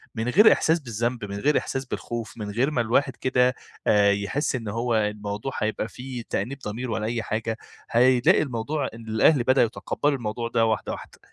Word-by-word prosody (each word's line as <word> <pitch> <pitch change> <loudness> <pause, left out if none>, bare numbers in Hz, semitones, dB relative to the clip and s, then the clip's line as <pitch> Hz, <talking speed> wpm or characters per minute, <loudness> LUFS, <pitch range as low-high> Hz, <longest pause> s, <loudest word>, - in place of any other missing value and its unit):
من 110 +1 -2
غير 210 - +7
إحساس 165 +2 +2
بالذنب 120 -3 -3
من 100 0 -6
غير 150 +7 +3
إحساس 135 0 -2
بالخوف، 120 -3 -5
من 105 -2 -5
غير 125 +8 +1
ما 125 - +1
الواحد 125 +4 +1
كده 125 0 +2 0.3
آآ 100 -1 +5
يحس 100 +10 -1
إن 115 -4 -5
هو 115 +3 -1
الموضوع 105 +3 -2
هيبقى 110 0 -1
فيه 125 0 -7
تأنيب 125 +8 -2
ضمير 120 +1 -5
ولا 110 -1 -2
أي 115 0 -2
حاجة، 110 +1 -2 0.3
هيلاقي 125 +1 +5
الموضوع 140 +2 -2
إن 115 0 -11
الأهل 120 +5 +4
بدأوا 130 0 +4
يتقبّلوا 140 +5 -1
الموضوع 115 0 -3
ده 115 -1 +2
واحدة، 110 -2 -1
واحدة، - - -9
120 Hz, 185 wpm, -25 LUFS, 110-130 Hz, 0.3 s, غير